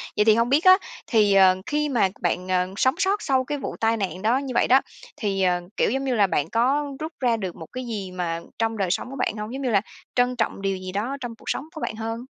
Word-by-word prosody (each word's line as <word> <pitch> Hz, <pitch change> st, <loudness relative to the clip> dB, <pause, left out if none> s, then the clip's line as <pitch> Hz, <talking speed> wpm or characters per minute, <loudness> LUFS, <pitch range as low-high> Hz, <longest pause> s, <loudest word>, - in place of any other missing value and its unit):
Vậy 210 Hz, -, +3 dB
thì 220 Hz, -1 st, +6 dB
hông 230 Hz, +1 st, +2 dB
biết 285 Hz, +5 st, +3 dB
á, 370 Hz, 0 st, +9 dB, 0.3 s
thì, 210 Hz, -4 st, +4 dB
ờ, 190 Hz, -1 st, +6 dB
khi 300 Hz, 0 st, 0 dB
mà 230 Hz, -8 st, +2 dB
bạn, 180 Hz, +1 st, -1 dB
ờ, 180 Hz, -1 st, +1 dB
sống 260 Hz, +5 st, +3 dB
sót 390 Hz, +2 st, +1 dB
sau 265 Hz, -6 st, +1 dB
cái 290 Hz, +3 st, -3 dB
vụ 275 Hz, -, -5 dB
tai 225 Hz, 0 st, +2 dB
nạn 190 Hz, -3 st, -3 dB
đó 230 Hz, +5 st, +3 dB
như 270 Hz, -2 st, -4 dB
vậy -, -, +3 dB
đó, 265 Hz, +2 st, +6 dB, 0.4 s
thì, 195 Hz, -3 st, -1 dB
ờ, 180 Hz, -1 st, +2 dB, 0.2 s
kiểu, -, -, +3 dB
giống 270 Hz, +2 st, -1 dB
như 260 Hz, -2 st, 0 dB
là, 205 Hz, -3 st, +4 dB
bạn 155 Hz, -4 st, -1 dB
có 275 Hz, +7 st, +1 dB
rút 315 Hz, +1 st, -5 dB
ra 240 Hz, -3 st, +2 dB
được 190 Hz, -4 st, -5 dB
một 160 Hz, -, -10 dB
cái 255 Hz, 0 st, -5 dB
gì 200 Hz, -5 st, -4 dB
mà 175 Hz, -2 st, -3 dB, 0.2 s
trong 225 Hz, 0 st, 0 dB
đời 190 Hz, -3 st, 0 dB
sống 195 Hz, -, -2 dB
của 270 Hz, -, -7 dB
bạn 220 Hz, -, -1 dB
hông? 210 Hz, +3 st, -5 dB
Giống 270 Hz, -, -4 dB
như 260 Hz, -, 0 dB
là 200 Hz, -4 st, +3 dB, 0.3 s
trân 250 Hz, 0 st, +2 dB
trọng 225 Hz, -4 st, -2 dB
điều 195 Hz, -1 st, -1 dB
gì 185 Hz, 0 st, -7 dB
đó 225 Hz, +8 st, -2 dB
trong 240 Hz, -2 st, -5 dB
cuộc -, -, -10 dB
sống 275 Hz, -, -2 dB
của 315 Hz, -2 st, -9 dB
bạn 220 Hz, -, -3 dB
hơn? 225 Hz, +2 st, -5 dB
225 Hz, 275 wpm, -24 LUFS, 195-260 Hz, 0.4 s, á